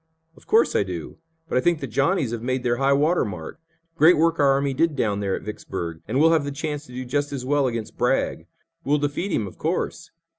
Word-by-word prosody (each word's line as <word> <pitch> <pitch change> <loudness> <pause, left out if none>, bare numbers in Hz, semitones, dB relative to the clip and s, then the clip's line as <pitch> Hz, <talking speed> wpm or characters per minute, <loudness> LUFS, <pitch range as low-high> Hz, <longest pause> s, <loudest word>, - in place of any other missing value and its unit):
"Of - - -20
course, 445 +1 +3
I - - +4
do. 90 -5 -6 0.3
But 125 - +1
I - - 0
think 170 +2 +2
the 140 - -4
Johnnies 140 - +1
have 120 -1 -4
made 130 +1 -2
their 120 -1 +1
high 135 +1 +2
water 150 +5 +3
mark. 95 - -7 0.4
Great 165 +1 +6
work 165 +1 +2
our 140 -1 +5
army 140 0 0
did 160 +2 +1
down 105 -6 0
there 100 -2 -1
at - - -7
Vicksburg, 85 -5 -6
and 120 +6 0
we'll 165 +2 +5
have 160 -3 +2
the 145 - -4
chance 150 +1 -4
to - - -14
do 130 +1 -5
just 145 +3 -1
as 135 -3 -4
well 145 0 +2
against 115 -3 -5
Bragg. - - 0 0.4
We'll 145 +2 +2
defeat 145 +7 -2
him, 110 - 0
of 95 - -11
course. 165 0 -2
140 Hz, 235 wpm, -24 LUFS, 120-155 Hz, 0.4 s, Great